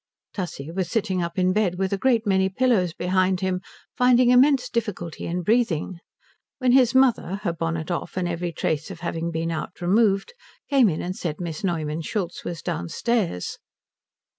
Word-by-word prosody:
Tussie 165 -6 -5
was 185 0 -2
sitting 195 -5 0
up 170 +1 -4
in 185 0 +2
bed 200 -4 +1
with 190 +1 -1
a - - +1
great 235 -2 +2
many 190 -1 +2
pillows 195 -5 +2
behind 185 +2 +1
him, 185 -1 -1 0.3
finding 250 0 +5
immense 265 +1 +5
difficulty 210 -8 -4
in 175 +1 -2
breathing, 195 -6 +1 0.6
when 255 -2 +2
his 255 -1 +4
mother, 245 -7 +3
her 170 -5 0
bonnet 165 0 -3
off 175 - -4
and 180 -1 0
every 175 0 -2
trace 155 0 -2
of 175 -3 -9
having 170 -1 -2
been 165 0 -2
out 160 +2 -5
removed, 195 - +2 0.4
came 265 -6 +5
in 160 - -3
and 180 +1 -3
said 160 -5 -4
Miss 170 -2 -5
Neumann 160 -4 -1
Schultz 180 0 -3
was 170 -3 -5
downstairs. 170 - -2
185 Hz, 170 wpm, -24 LUFS, 170-220 Hz, 0.6 s, finding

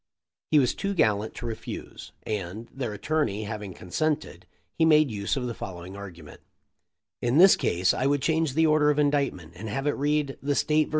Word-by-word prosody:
He 155 - +4
was 130 -4 +3
too 200 0 -3
gallant 110 - +1
to 120 - -7
refuse 115 0 -7
and, 105 +2 -4
their 125 -5 -3
attorney 110 -2 -1
having 105 -2 -6
consented, 150 - -3 0.3
he 165 - +1
made 155 -4 +5
use 105 +5 -2
of 125 - -2
the 120 - -3
following 90 -2 -8
argument: 90 -6 -10 0.8
"In 120 +3 +1
this 190 +3 +8
case 90 +2 +1
I 130 - 0
would 140 -1 +1
change 160 -3 +1
the 160 +1 +4
order 150 -1 +4
of 150 - +2
indictment 140 - 0
and 110 +5 -7
have 135 +6 -3
it 145 - +3
read 145 -1 -1
The 145 +1 0
State 155 +1 +2
vs. - - -13
130 Hz, 190 wpm, -26 LUFS, 100-150 Hz, 0.8 s, this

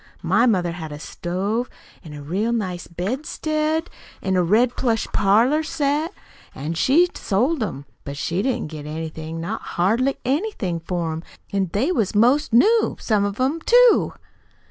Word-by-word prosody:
My 205 +9 +3
mother 180 -6 +2
had 160 -3 -7
a 145 - -6
stove 195 +10 -3 0.3
an' 155 -4 -10
a 145 - -8
real 195 +10 -1
nice 185 -7 -3
bedstead, 305 - -2 0.4
an' 190 -1 0
a 180 - +3
red 225 +8 +3
plush 230 -4 0
parlor 230 +10 +3
set, 310 0 -1 0.4
an' 150 +4 -4
she 280 - +4
sold 250 +9 0
'em. 145 -10 -4 0.2
But 140 0 -6
she 170 +6 -1
didn't 240 - -2
get 150 -1 -7
anything 160 +1 -5
not 165 - -4
hardly 230 +10 0
anything, 260 - -1
for 170 -1 -3
'em; 160 +1 -5 0.3
an' 195 -2 0
they 255 - +1
was 215 - 0
'most 250 +8 +3
new, 435 - +4
some 210 -3 +1
of 205 +2 -4
'em, 280 +6 0
too." 485 +5 +5
210 Hz, 160 wpm, -22 LUFS, 170-270 Hz, 0.4 s, too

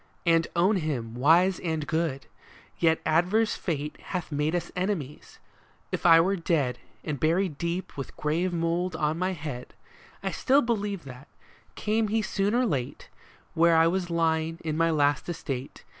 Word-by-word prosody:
And 165 -1 +3
own 190 +5 +3
him 135 -9 -3
wise 165 +9 +4
and 160 -3 -2
good. 155 -2 -1 0.5
Yet 160 -1 +3
adverse 180 +8 +2
fate 150 -3 -4
Hath 180 -4 -5
made 150 +3 0
us 175 - -3
enemies. 180 -7 -3 0.5
If - - 0
I 165 -1 +8
were 190 +4 +2
dead. 160 -8 0 0.2
And 145 -3 -3
buried 165 -1 +1
deep 170 +2 -3
with 135 - -7
grave 165 +5 0
mould 170 +1 -1
on 155 +1 -1
my 185 +1 0
head, 145 -7 -7 0.5
I 195 - -1
still 275 +8 +3
believe 205 -5 -2
that, 130 +1 -11 0.5
came 215 +1 0
he 220 +1 0
soon 200 +2 0
or 250 +1 +3
late 135 - -3 0.4
Where 165 0 +4
I 160 - +6
was 175 +1 0
lying 165 -1 0
in 155 -1 -1
my 165 +1 +2
last 145 0 +1
estate. 140 -6 -5
165 Hz, 160 wpm, -27 LUFS, 150-185 Hz, 0.5 s, I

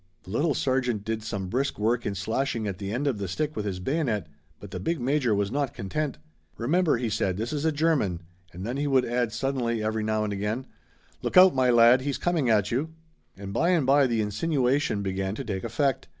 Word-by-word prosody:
The 95 - -11
little 145 +7 +1
sergeant 125 -6 0
did 110 0 -2
some 100 -3 -4
brisk 130 +8 -1
work 115 +3 0
in 100 - -2
slashing 110 +3 -1
at 95 -3 -4
the 100 -1 -4
end 125 +6 -2
of 130 -7 0
the 100 - -3
stick 150 - -2
with 105 - -3
his 95 -3 -3
bayonet 125 - -1 0.3
but 100 -1 -11
the - - -5
big 165 -1 -1
major 125 -3 +1
was 100 0 0
not 140 -1 -1
content. 140 +9 -3 0.4
"Remember," 155 +6 +2
he 120 0 -2
said, 95 -4 -1
"this 115 +5 -3
is 150 +1 -2
a 160 - +3
German," 145 - 0 0.3
and 90 +3 -7
then 120 +4 -3
he 145 +1 -1
would 130 -2 +3
add 120 -1 0
suddenly 120 -2 -1
every 110 0 -1
now 110 0 0
and 105 -1 -2
again: 105 +6 -2 0.6
"Look - - -1
out, 185 0 +9
my 130 -1 +2
lad 120 +1 +6
he's 140 0 -2
coming 165 -8 0
at 105 -3 +2
you!" 155 +7 -2 0.4
And 100 0 -7
bye 170 - +2
and 170 -6 +3
bye 140 +1 +5
the 115 -3 0
insinuation 125 0 0
began 95 +1 -2
to 135 - -5
take 100 -5 -4
effect. 130 +3 0
120 Hz, 220 wpm, -26 LUFS, 105-140 Hz, 0.6 s, out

